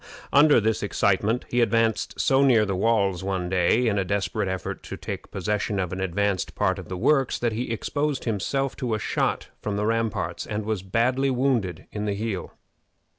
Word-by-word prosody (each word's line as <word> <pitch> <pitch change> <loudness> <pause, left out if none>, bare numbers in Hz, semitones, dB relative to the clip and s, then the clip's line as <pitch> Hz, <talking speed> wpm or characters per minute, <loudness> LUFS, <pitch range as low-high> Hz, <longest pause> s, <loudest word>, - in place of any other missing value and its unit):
Under 145 -2 +7
this 110 0 0
excitement 105 +3 +1
he 120 - +1
advanced 115 0 +1
so 135 0 +4
near 120 -6 +5
the 100 -2 -2
walls 100 -3 +1
one 95 -2 -2
day, 95 +7 +2
in 105 -2 +1
a - - +1
desperate 100 +1 -1
effort 95 0 -4
to - - -7
take - - -6
possession 105 +1 -2
of 90 -1 -2
an 95 - -4
advanced 95 0 -1
part 95 -2 +1
of 95 - -10
the 90 - -4
works, 135 +6 +2
that 120 -2 -1
he 120 +3 -3
exposed 145 +5 -1
himself 130 +5 -1
to 120 -4 -1
a - - -3
shot - - -1
from 105 - -2
the 105 +1 -1
ramparts, 115 -1 -1
and 105 0 -3
was 110 -3 -1
badly 125 +8 +1
wounded 125 -8 0
in 105 0 -3
the 100 -1 -1
heel. 105 -2 -3
105 Hz, 190 wpm, -25 LUFS, 95-120 Hz, -, Under